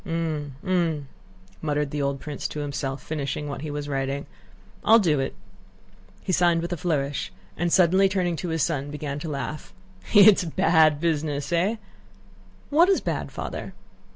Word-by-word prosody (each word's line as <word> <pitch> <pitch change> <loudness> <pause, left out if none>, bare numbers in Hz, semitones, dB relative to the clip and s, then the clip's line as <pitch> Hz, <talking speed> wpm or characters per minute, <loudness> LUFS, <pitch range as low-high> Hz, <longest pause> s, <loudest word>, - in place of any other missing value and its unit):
"Hm... 160 -5 -3
Hm..." 165 -6 0 0.5
muttered 150 -2 -1
the 145 - -2
old 140 0 -1
prince 150 -1 -5
to 150 - -6
himself, 140 -1 -4
finishing 150 -1 -3
what 140 -2 -5
he 155 - -5
was 145 0 -4
writing. 135 0 -2 0.6
"I'll 225 - +7
do 165 -10 +2
it." 135 - -2 0.9
He - - -2
signed 170 -1 +3
with 175 +1 -3
a - - -3
flourish 145 - -1 0.2
and 175 0 -1
suddenly 190 +2 +5
turning 180 -3 0
to 175 - -4
his 160 -2 0
son 145 -4 -1
began 145 -1 -4
to 160 - -5
laugh. 150 +1 -5 0.4
"It's 205 -1 +8
a 175 - -4
bad 160 -2 +4
business, 150 -3 -1
eh?" 185 +7 +2 1.0
"What 335 +6 +5
is 390 - +4
bad, - - -3
Father?" - - -6
155 Hz, 165 wpm, -25 LUFS, 145-175 Hz, 1.0 s, It's